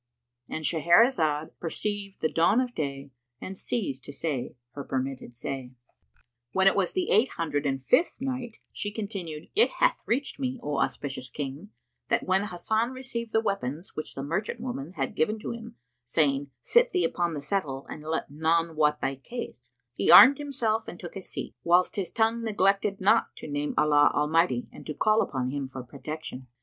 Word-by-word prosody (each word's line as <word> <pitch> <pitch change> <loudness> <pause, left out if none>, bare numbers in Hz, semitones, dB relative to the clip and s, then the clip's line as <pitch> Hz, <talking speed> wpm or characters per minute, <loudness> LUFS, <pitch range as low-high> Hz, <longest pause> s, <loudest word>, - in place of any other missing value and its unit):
—And 155 - -4
Shahrazad 165 - +3
perceived 200 +3 -4
the 160 - +3
dawn 170 +8 +4
of 250 -1 -1
day 140 - -4 0.3
and 190 - -6
ceased 165 - -3
to - - -7
say 140 -5 -3 0.2
her 140 +3 -6
permitted 130 -2 -4
say. 130 +1 -5 0.8
When 190 0 +3
it 195 - +6
was 195 -2 +1
the 365 -1 -1
Eight 225 +5 +5
Hundred 150 -4 -1
and 135 -1 0
Fifth 300 - +2
Night, 255 -3 -4 0.2
She 205 - -2
continued, 195 -8 -6
It 440 +5 +5
hath - - +3
reached 275 +4 -1
me, 260 -1 -2
O 145 -1 -1
auspicious 135 -1 -2
King, 145 +7 -6 0.4
that - - +2
when 190 +2 +2
Hasan 220 +5 0
received 235 -3 -5
the 220 - +3
weapons 170 - -3
which 155 - -5
the 135 - -4
merchant 190 +10 -2
woman 185 - -5
had 135 -6 -2
given 210 +8 +1
to 210 - -5
him, 230 0 -8 0.3
saying, 140 +2 +1
"Sit 480 +1 +4
thee 365 - +2
upon 170 -2 0
the - - -3
settle 145 -6 -2
and - - -8
let 160 -1 -3
none 160 +2 +1
wot 150 -1 +2
thy 135 - 0
case," 235 - -8 0.2
he - - -1
armed 275 +2 +10
himself 235 -6 -1
and 175 - -8
took 175 - -8
his 195 - -7
seat, - - -5
whilst 175 +1 +3
his 190 -4 -2
tongue 225 +2 +1
neglected 200 -2 +1
not 205 +4 +3
to - - -9
name 145 0 -2
Allah 145 -1 +5
Almighty 150 -5 +2
and - - -11
to 150 - -4
call 215 +1 +3
upon 130 -2 -2
Him 140 -1 -3
for 130 -1 -7
protection. 140 0 -7
170 Hz, 185 wpm, -27 LUFS, 145-220 Hz, 0.8 s, armed